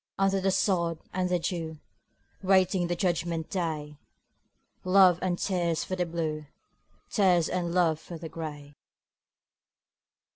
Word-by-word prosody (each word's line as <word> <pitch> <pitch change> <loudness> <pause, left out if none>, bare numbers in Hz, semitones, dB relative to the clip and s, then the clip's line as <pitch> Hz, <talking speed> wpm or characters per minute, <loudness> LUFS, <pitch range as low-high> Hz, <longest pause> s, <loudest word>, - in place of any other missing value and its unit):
Under 195 0 +2
the 195 - +2
sod 175 -4 +1 0.2
and 185 0 0
the 180 - +2
dew, 165 -2 -3 0.6
Waiting 190 -2 +3
the 175 - -1
judgment 170 -3 -1
day; 155 -5 -3 0.8
Love 185 -2 +5
and 180 -1 0
tears 175 -5 0
for 185 - -3
the 180 -1 -1
Blue, 155 -3 -3 0.6
Tears 180 -5 +3
and 175 -2 -2
love 170 -3 +2
for 170 +1 -9
the 160 0 -7
Gray. 150 -3 -7
175 Hz, 125 wpm, -28 LUFS, 160-185 Hz, 0.8 s, Love